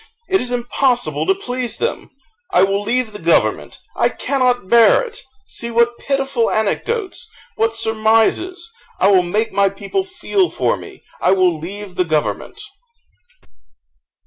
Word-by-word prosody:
It 380 0 +2
is 250 - -3
impossible 245 +2 0
to 385 - +3
please 250 -9 -4
them; 475 - -3 0.4
I 185 - +4
will 195 +1 +1
leave 230 +2 -1
the 205 - -9
government 170 0 +1 0.2
I - - +2
cannot 250 -6 0
bear 235 - +5
it! 475 -1 -9 0.3
See 235 - -5
what 235 +1 +2
pitiful 270 -4 0
anecdotes 385 - -2 0.3
what 225 0 0
surmises: 225 - +1 0.3
I 195 - +4
will 190 -2 +6
make 210 +6 -1
my 200 0 +3
people 200 - -3
feel 375 0 -1
for - - 0
me - - -12 0.2
I 185 - +4
will 185 -3 +3
leave 190 +5 -7
the 180 0 0
government!" 155 -2 -2
230 Hz, 145 wpm, -18 LUFS, 200-270 Hz, 0.4 s, will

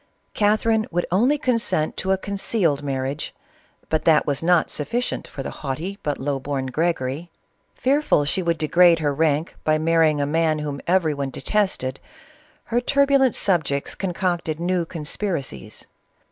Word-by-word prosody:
Catherine 215 +1 +2
would 175 +1 -1
only 245 +11 +3
consent 230 - 0
to 190 - -3
a 190 - +3
concealed 195 -6 0
marriage, 135 +1 -3 0.5
but 155 - 0
that 155 -2 +5
was 140 -2 -1
not 175 0 +3
sufficient 235 - -2
for 135 - -7
the - - -5
haughty, 160 +9 -4
but 145 -1 -2
low 140 0 -2
born 135 0 -3
Gregory. 155 +1 -2 0.5
Fearful 270 - +2
she 185 +6 0
would 170 -2 0
degrade 170 +2 +5
her 150 -3 0
rank 155 +1 0
by 155 0 +2
marrying 160 -1 +3
a 145 - +1
man 160 +1 +1
whom 145 -2 -4
every 170 -3 +2
one 140 -1 -3
detested, 135 -5 -1 0.6
her 240 +1 0
turbulent 275 -1 +3
subjects 160 -7 0
concocted 175 -4 -2
new 175 0 0
conspiracies. 150 - -4
165 Hz, 145 wpm, -23 LUFS, 145-190 Hz, 0.6 s, that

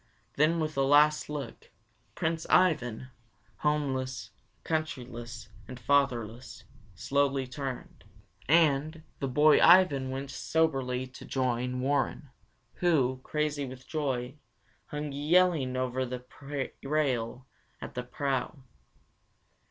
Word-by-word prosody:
Then 155 +3 +2
with 155 -1 -2
a - - +3
last 150 +3 +4
look, 145 -5 -6 0.5
Prince 160 0 -2
Ivan, 130 -9 +2 0.5
homeless, 135 -4 -1 0.3
countryless, 120 -8 -4 0.2
and 125 -1 -9
fatherless, 125 -3 0 0.3
slowly 140 -1 0
turned, 130 0 -7 0.5
and, 155 0 +3 0.2
the 135 - -1
boy 150 +4 +5
Ivan 170 -7 +6
went 135 +1 -5
soberly 135 -6 0
to 130 0 -12
join 125 -1 -1
Warren, 140 +1 -1 0.5
who, 135 -8 +2
crazy 150 -2 -2
with 130 0 -10
joy, 135 -3 -3 0.5
hung 150 0 -4
yelling 150 -2 +2
over 130 0 -1
the 125 0 -6 0.6
rail 130 -4 -1 0.3
at - - -8
the 125 - -3
prow. 135 +2 -3
135 Hz, 105 wpm, -29 LUFS, 125-150 Hz, 0.6 s, Ivan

